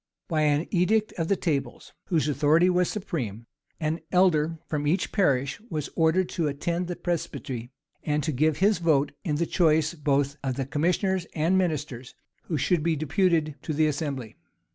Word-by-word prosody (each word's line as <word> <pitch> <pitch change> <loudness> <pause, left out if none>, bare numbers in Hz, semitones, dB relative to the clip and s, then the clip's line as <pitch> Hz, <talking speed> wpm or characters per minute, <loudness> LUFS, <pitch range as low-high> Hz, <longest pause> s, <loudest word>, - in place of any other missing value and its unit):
By 160 -3 0
an 150 +1 +2
edict 215 +4 +2
of 165 - 0
the 200 - +2
tables, 140 -9 -3
whose 165 -5 +1
authority 155 +5 +3
was 180 0 +2
supreme, 125 - -4 0.3
an 160 0 -1
elder 165 -3 +3
from 145 -1 -2
each 175 +6 +1
parish 140 -6 +1
was 155 -4 -4
ordered 165 +3 +3
to 165 -3 -1
attend 170 +5 -2
the 175 - -3
presbytery, 135 -9 -4 0.3
and 150 -1 0
to 155 - 0
give 155 +2 +1
his 200 +2 +3
vote 150 -4 +2
in 155 -7 -1
the 170 +3 0
choice 160 -2 +2
both 145 -2 0
of 130 -2 -1
the 135 - -2
commissioners 175 +5 0
and 165 +4 +2
ministers 150 -9 -2 0.3
who 160 - -2
should 170 +4 +1
be 165 +1 +1
deputed 155 0 +1
to 155 - -3
the 155 +1 +3
assembly. 140 -6 -3
155 Hz, 170 wpm, -26 LUFS, 145-175 Hz, 0.3 s, authority